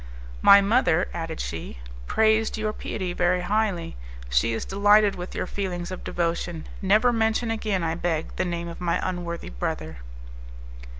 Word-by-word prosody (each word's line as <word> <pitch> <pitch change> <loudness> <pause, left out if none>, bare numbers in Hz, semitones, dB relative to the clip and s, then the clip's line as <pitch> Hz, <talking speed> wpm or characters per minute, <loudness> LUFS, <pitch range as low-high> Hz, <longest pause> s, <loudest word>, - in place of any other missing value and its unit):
"My 200 0 +8
mother," 200 -5 +2
added 165 -1 -5
she, 80 -6 -5 0.3
"praised 220 0 +2
your 215 0 -2
piety 185 -4 -4
very 180 +1 +1
highly; 195 - -1 0.3
she 60 - +2
is 115 - -3
delighted 205 +1 +4
with 180 0 -7
your - - -2
feelings 180 -2 -4
of 185 - -6
devotion. 170 -1 -2 0.2
Never 215 +6 +4
mention 225 +1 +1
again, 215 -5 -1
I 160 -1 0
beg, 165 -1 -2
the - - 0
name 170 -1 -3
of 170 +1 -8
my 170 -1 0
unworthy 175 - -4
brother." 80 +6 -4
180 Hz, 155 wpm, -25 LUFS, 170-210 Hz, 0.3 s, My